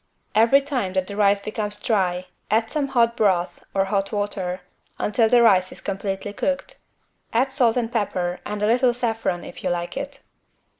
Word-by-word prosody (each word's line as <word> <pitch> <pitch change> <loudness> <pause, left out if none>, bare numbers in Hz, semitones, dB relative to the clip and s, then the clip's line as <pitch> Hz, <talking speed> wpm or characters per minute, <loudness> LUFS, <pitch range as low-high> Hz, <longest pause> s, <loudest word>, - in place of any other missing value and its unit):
Every 230 +6 +5
time 255 -10 -2
that 190 -1 0
the 200 - -7
rice 200 -1 +4
becomes 210 -1 -2
dry, 185 -5 0 0.2
add 225 +1 +1
some 290 -2 0
hot 235 -3 +2
broth 180 -5 +1
(or 195 0 +1
hot 195 0 -1
water) 195 -3 -2 0.4
until 220 +2 +2
the 240 0 +5
rice 185 -5 +4
is - - -8
completely 195 0 -4
cooked. 275 +6 -2 0.5
Add 255 +4 +2
salt 245 -3 +3
and 235 -2 -1
pepper 185 -6 -1
and 210 0 -4
a - - +4
little 240 +2 +3
saffron, 225 -7 -1
if - - -10
you - - 0
like 175 0 -3
it. 280 0 -6
210 Hz, 180 wpm, -23 LUFS, 190-235 Hz, 0.5 s, Every